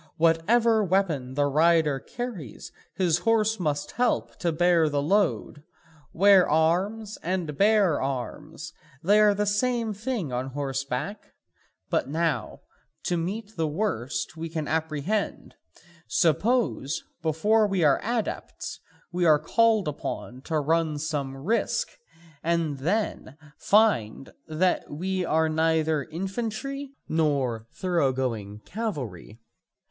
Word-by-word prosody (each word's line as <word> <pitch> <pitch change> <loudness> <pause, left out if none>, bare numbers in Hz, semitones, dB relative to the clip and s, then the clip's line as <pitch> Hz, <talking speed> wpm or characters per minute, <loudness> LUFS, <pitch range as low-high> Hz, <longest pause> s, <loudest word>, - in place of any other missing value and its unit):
Whatever 215 +8 +3
weapon 165 -9 0
the 145 0 +2
rider 155 0 +3
carries 205 - -7 0.2
his 175 -3 +2
horse 220 +1 +2
must 150 -3 -2
help 245 0 0
to 170 - 0
bear 170 -1 +3
the 145 -1 0
load: 170 -1 0 0.5
'wear 195 +1 +5
arms' 190 +8 +1
and 175 -4 -2
'bear 200 -3 +3
arms,' 150 +4 -5 0.3
they 205 +5 +5
are 210 -1 +5
the 210 +1 0
same 225 +2 0
thing 210 - -3
on 125 +2 -2
horseback. 135 +7 -4 0.6
But - - 0
now, 155 -7 -1 0.4
to 175 - 0
meet 200 +6 -4
the 160 -2 0
worst 150 - -2
we 165 0 -5
can 155 -2 -3
apprehend: 160 +6 -2 0.5
suppose, 170 - +1 0.2
before 210 +8 +2
we 195 -4 0
are 145 -3 +4
adepts, 230 0 -3 0.3
we 175 0 0
are 155 -2 +6
called 220 +5 +2
upon 130 -3 -5
to 160 -2 0
run 160 +1 +1
some 145 -3 -3
risk, 205 +13 0 0.5
and 165 -4 0
then 175 -3 -2 0.2
find 195 - +2
that 175 +4 0
we 185 +5 -2
are 160 -1 +2
neither 160 -2 +1
infantry 230 - -4
nor 140 -8 0
thoroughgoing 130 - -1
cavalry? 130 - -5
165 Hz, 115 wpm, -26 LUFS, 145-205 Hz, 0.6 s, are